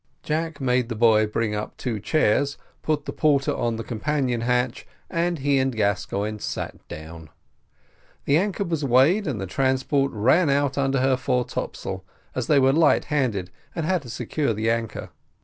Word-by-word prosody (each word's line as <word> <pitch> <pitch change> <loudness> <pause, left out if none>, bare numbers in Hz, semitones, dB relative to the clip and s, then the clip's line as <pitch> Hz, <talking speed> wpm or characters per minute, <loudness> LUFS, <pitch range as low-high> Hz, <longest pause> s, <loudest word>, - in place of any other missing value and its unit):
Jack 160 0 -2
made 125 -2 +1
the 115 - -3
boy 110 -1 +4
bring 105 0 -1
up 105 0 -5
two 115 -5 -3
chairs, 140 +3 +1 0.2
put 150 -2 -1
the - - -5
porter 145 -3 +2
on 115 -1 -1
the 115 - -5
companion 125 +1 -1
hatch, 125 0 0 0.2
and 170 +1 0
he 140 -1 +2
and 130 -2 0
Gascoigne 105 0 -1
sat - - -5
down. 80 +1 -9 1.0
The 140 - +3
anchor 200 +2 0
was 165 -5 -2
weighed, 140 - +4
and 130 -8 -2
the 95 - -3
transport 135 - +1
ran 130 - +3
out 140 -1 +1
under 135 -1 +1
her 130 0 +3
fore 125 -1 0
topsail, 95 0 -5 0.3
as 125 -3 -3
they 150 - +4
were 135 0 +4
light 160 -1 +4
handed, 110 -11 0 0.2
and 165 -3 -2
had 185 0 +1
to 125 - -11
secure 120 +1 -2
the 110 +2 +1
anchor. 115 -2 -3
130 Hz, 175 wpm, -24 LUFS, 110-145 Hz, 1.0 s, boy